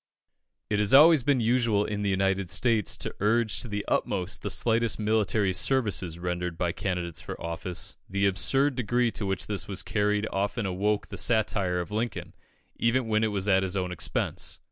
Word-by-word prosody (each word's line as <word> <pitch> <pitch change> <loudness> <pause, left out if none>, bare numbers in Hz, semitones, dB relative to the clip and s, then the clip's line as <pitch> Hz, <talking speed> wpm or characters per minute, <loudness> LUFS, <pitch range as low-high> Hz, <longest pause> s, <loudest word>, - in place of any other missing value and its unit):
It 105 - +1
has 105 +4 +4
always 155 +1 +8
been 135 +1 +2
usual 115 -3 +2
in 105 -1 -3
the 100 - 0
United 95 -1 0
States 115 -1 +1
to - - -4
urge 110 +1 +1
to 125 - -5
the 105 -2 -4
utmost 90 +1 -1
the 100 - -3
slightest 115 +2 +1
military 105 -2 +1
services 95 -4 0
rendered 90 -1 -3
by 85 -1 0
candidates 90 -3 -3
for - - -7
office. 85 +2 -5
The 100 +1 0
absurd 135 +9 +2
degree 120 0 +1
to 105 - -4
which 95 0 -2
this 105 -2 -4
was 100 -2 -3
carried 105 0 0
often 100 +3 -1
awoke 100 +3 0
the - - -7
satire 100 -5 0
of 90 - -5
Lincoln, 110 +1 -3 0.4
even 120 +1 +1
when 110 0 +2
it - - +3
was 100 -2 -2
at 95 -2 +4
his 95 0 -2
own 90 -1 -2
expense. 90 - -1
105 Hz, 185 wpm, -27 LUFS, 95-115 Hz, 0.4 s, always